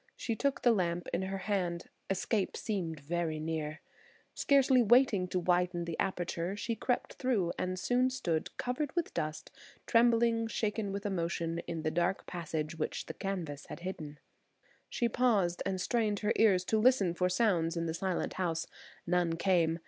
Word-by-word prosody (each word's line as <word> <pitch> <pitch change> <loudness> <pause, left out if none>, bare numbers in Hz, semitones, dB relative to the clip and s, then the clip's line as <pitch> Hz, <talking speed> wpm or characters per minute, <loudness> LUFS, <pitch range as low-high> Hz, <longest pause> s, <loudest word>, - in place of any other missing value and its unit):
She 230 - -2
took 280 +3 -1
the 240 - +6
lamp 175 -5 0
in 175 - +1
her 190 +1 -3
hand. 185 -3 -1 0.3
Escape 195 +1 0
seemed 175 -8 -3
very 160 +1 -2
near. 155 -1 -3 0.5
Scarcely 270 -2 +4
waiting 230 -5 +4
to 185 - -2
widen 180 0 +1
the 170 -1 -4
aperture, 180 -1 -1
she 230 +2 -2
crept 245 +3 -1
through, 215 -10 0
and 185 0 -1
soon 250 +6 +2
stood, 170 -11 -1
covered 260 +5 -2
with 345 -2 -1
dust, 155 -2 -3 0.3
trembling 230 -1 +3
shaken 215 -2 -1
with 200 +1 -4
emotion, 170 -3 -1
in 165 -2 -4
the 155 - 0
dark 175 +4 0
passage 160 -2 -4
which 155 - -2
the - - -6
canvas 170 -8 -4
had - - -8
hidden. 155 -5 -6 0.7
She 240 - 0
paused 215 -8 +2
and 190 -1 -1
strained 215 -1 0
her 210 0 +2
ears 190 -5 +4
to 220 - +2
listen 215 -7 +4
for 180 +1 +1
sounds 180 -4 +2
in 170 - -1
the 160 - -2
silent 185 +1 -2
house. 165 -2 0 0.4
None 175 -1 +1
came. 170 -3 +2
185 Hz, 165 wpm, -32 LUFS, 170-220 Hz, 0.7 s, the